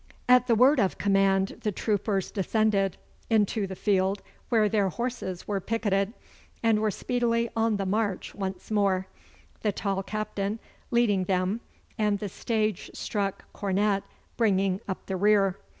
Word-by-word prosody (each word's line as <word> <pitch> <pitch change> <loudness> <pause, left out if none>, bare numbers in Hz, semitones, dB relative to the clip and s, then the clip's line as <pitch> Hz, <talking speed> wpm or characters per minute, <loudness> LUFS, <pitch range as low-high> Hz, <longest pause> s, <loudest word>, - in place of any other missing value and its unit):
At 250 0 +6
the 235 - +4
word 260 +5 +5
of 195 -4 +1
command 195 -1 +2
the 210 - 0
troopers 200 -1 -1
descended 200 -1 +1 0.3
into 215 -2 +2
the 190 - -6
field 195 0 +1 0.3
where 220 -3 +4
their 205 -2 +2
horses 235 -5 -4
were 205 -2 0
picketed, 205 -1 0 0.5
and 225 -2 +4
were 215 0 +1
speedily 235 +2 0
on 225 -2 +2
the 195 - -2
march 205 0 -1
once 190 0 -5
more, 195 -3 +2 0.6
the 210 - +1
tall 195 -1 -2
Captain 210 0 -3 0.3
leading 215 -6 +2
them, 185 +4 0 0.4
and 210 -1 +2
the 205 0 -4
stage 215 0 -1
struck 200 -2 -2
cornet 200 0 +1 0.4
bringing 195 -4 +2
up 190 - -5
the 190 - -3
rear. 195 -1 +3
205 Hz, 145 wpm, -27 LUFS, 195-220 Hz, 0.6 s, At